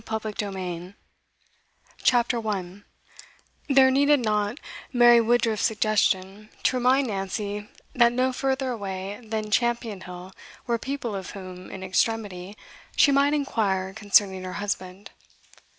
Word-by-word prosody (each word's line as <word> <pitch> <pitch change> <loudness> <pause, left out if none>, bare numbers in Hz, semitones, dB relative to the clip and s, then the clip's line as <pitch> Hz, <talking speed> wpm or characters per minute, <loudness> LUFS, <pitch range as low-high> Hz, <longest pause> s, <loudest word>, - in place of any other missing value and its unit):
Part 220 -1 -4
V: 215 - -3
Compassed 200 -2 -4
Round 180 +1 -6 1.1
CHAPTER 240 -1 +3
1 200 -3 -4 0.9
There 265 -1 +6
needed 285 +2 +4
not 210 +3 0 0.3
Mary 240 -1 +6
Woodruff's 230 -2 +1
suggestion 210 -2 0
to - - +2
remind 255 +2 +3
Nancy 205 0 -4 0.2
that 235 -1 +5
no 255 +1 +1
further 265 0 -1
away 195 -2 -5
than 215 -1 -4
Champion 235 -3 0
Hill 180 +1 -10 0.3
were 235 -2 0
people 260 -3 -4
of 190 -2 -6
whom, 185 -1 -9
in 190 - -8
extremity, 200 0 -1 0.4
she 285 - +5
might 280 +2 +3
inquire 195 -9 -1
concerning 200 -2 +2
her 185 0 -6
husband. 200 -1 -5
215 Hz, 130 wpm, -25 LUFS, 190-240 Hz, 1.1 s, There